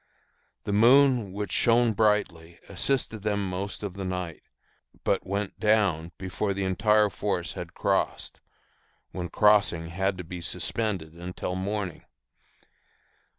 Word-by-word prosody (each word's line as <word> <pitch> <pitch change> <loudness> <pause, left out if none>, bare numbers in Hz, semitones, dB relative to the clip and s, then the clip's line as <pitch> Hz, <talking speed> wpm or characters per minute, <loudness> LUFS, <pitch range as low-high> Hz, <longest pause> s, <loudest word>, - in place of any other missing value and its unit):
The 100 - -2
moon, 120 -1 +5
which 100 0 -4
shone 120 -1 +3
brightly, 95 -6 0
assisted 110 +2 -1
them 100 -1 -1
most 95 +3 -4
of 100 -3 -4
the 100 0 -6
night, 90 -3 -4 0.6
but - - 0
went 100 0 -3
down 100 -7 +2
before 95 +2 -2
the 100 - -2
entire 105 +3 +3
force - - -2
had - - -8
crossed, - - -1 0.7
when 90 -2 -5
crossing 100 -5 +3
had 95 +2 -1
to 90 - -5
be 90 +1 -7
suspended 95 -3 -2
until 90 +1 -5
morning. 95 -2 -3
100 Hz, 125 wpm, -27 LUFS, 90-105 Hz, 0.7 s, moon